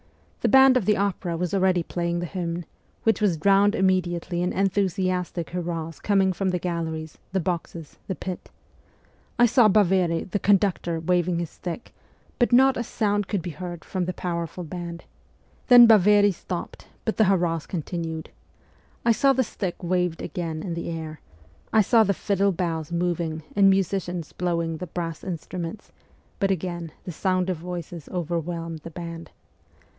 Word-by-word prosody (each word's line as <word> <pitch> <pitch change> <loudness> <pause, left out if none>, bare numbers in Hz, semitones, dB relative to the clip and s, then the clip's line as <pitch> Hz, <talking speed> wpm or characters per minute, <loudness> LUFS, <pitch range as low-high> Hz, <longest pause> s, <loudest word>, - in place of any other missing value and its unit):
The - - +1
band 265 -1 +7
of 245 -7 +2
the 210 +1 +3
opera 190 -3 -1
was 180 +1 -2
already 185 -3 +2
playing 170 0 -2
the 175 - -2
hymn, 175 -1 -4 0.4
which 225 0 +2
was 190 -6 +2
drowned 200 +5 +4
immediately 175 -2 0
in 180 - 0
enthusiastic 185 -3 -1
hurrahs 165 -2 -4
coming 195 -2 +2
from 190 +1 -1
the 180 - 0
galleries, 160 -3 -4
the 190 - +1
boxes, 170 -2 -4
the 190 - -2
pit. 185 0 -6 0.9
I 240 - +6
saw 240 -1 +5
Baveri, 185 -4 +3
the 205 - 0
conduc 200 -2 +3
tor, 170 -1 -2
waving 175 +1 +1
his 170 -2 -3
stick, 175 +5 -7 0.5
but 240 - +3
not 265 +2 +6
a 235 - -2
sound 205 -3 0
could 200 -6 -2
be 175 - -4
heard 175 0 -7
from 185 -2 -2
the 185 - -3
powerful 170 0 -4
band. 170 0 -6 0.6
Then 245 -2 +10
Baveri 205 -2 +6
stopped, 175 0 -6 0.2
but 220 - -1
the 220 - +5
hurrahs 175 -4 +1
continued. 165 -1 -4 0.7
I 235 - +5
saw 270 +4 +4
the 260 0 +2
stick 190 -5 -5
waved 180 -1 0
again 165 -4 -4
in 175 - -3
the 170 0 -4
air; 160 -2 -6 0.5
I 220 - +5
saw 225 +3 +5
the 200 -2 +1
fiddle 200 +1 +1
bows 165 -3 -3
moving 170 -2 -1
and 195 -1 +6
musicians 185 -3 0
blowing 170 -2 -1
the 180 - -6
brass 165 -1 -5
instruments, 180 +2 -6 0.5
but 195 -3 +2
again 175 -3 -3
the 180 - -6
sound 185 +2 0
of 180 - -3
voices 175 -1 -7
overwhelmed 170 -1 -3
the 160 - -9
band. 170 -1 -7
180 Hz, 165 wpm, -25 LUFS, 170-195 Hz, 0.9 s, Then